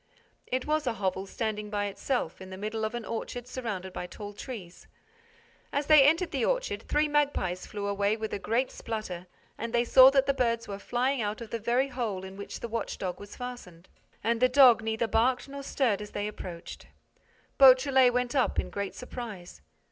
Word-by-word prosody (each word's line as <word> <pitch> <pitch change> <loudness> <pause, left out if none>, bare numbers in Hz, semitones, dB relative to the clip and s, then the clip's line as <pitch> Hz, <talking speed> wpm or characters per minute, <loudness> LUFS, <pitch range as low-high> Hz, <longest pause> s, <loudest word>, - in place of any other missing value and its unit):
It 255 0 -1
was 305 -2 0
a 240 - +1
hovel 190 -2 -2
standing 210 0 -3
by 205 -1 -1
itself, 200 -2 -2
in 190 - -9
the 190 - -8
middle 215 +2 -3
of 220 - -3
an 240 -2 -5
orchard 240 +1 -5
surrounded 210 -8 -5
by 180 - -5
tall 205 +2 -8
trees. 200 -6 -9 0.8
As 285 +1 -1
they 305 -1 +8
entered 330 +4 +2
the - - -1
orchard, - - 0
three 300 +1 +2
magpies 285 -12 0
flew 205 -1 -5
away 200 +1 +1
with 220 -1 -4
a - - -2
great 235 +6 0
splutter 185 -6 -5 0.3
and 230 +1 -4
they 235 0 +3
saw 260 +2 +9
that 270 -1 +3
the 275 - +2
birds 230 -3 0
were 200 -1 -6
flying 250 +4 0
out 210 0 -2
of 230 -2 -9
the 230 - -2
very 245 +5 +1
hole 225 -8 -3
in 190 0 -8
which 200 0 -8
the - - -3
watch 230 0 -3
dog 180 -2 -4
was 205 0 -10
fastened. 220 -9 -9 0.3
And 230 +2 +1
the 255 - +5
dog 250 -3 +7
neither 225 +1 -1
barked 245 +4 +1
nor 280 0 -7
stirred 250 -7 0
as 210 - -7
they 205 0 -3
approached. 180 -5 -8 0.7
Beautrelet 260 -1 +7
went 250 0 -1
up 265 -3 +1
in - - -3
great 200 -1 -4
surprise. 220 - -8
230 Hz, 200 wpm, -29 LUFS, 205-255 Hz, 0.8 s, saw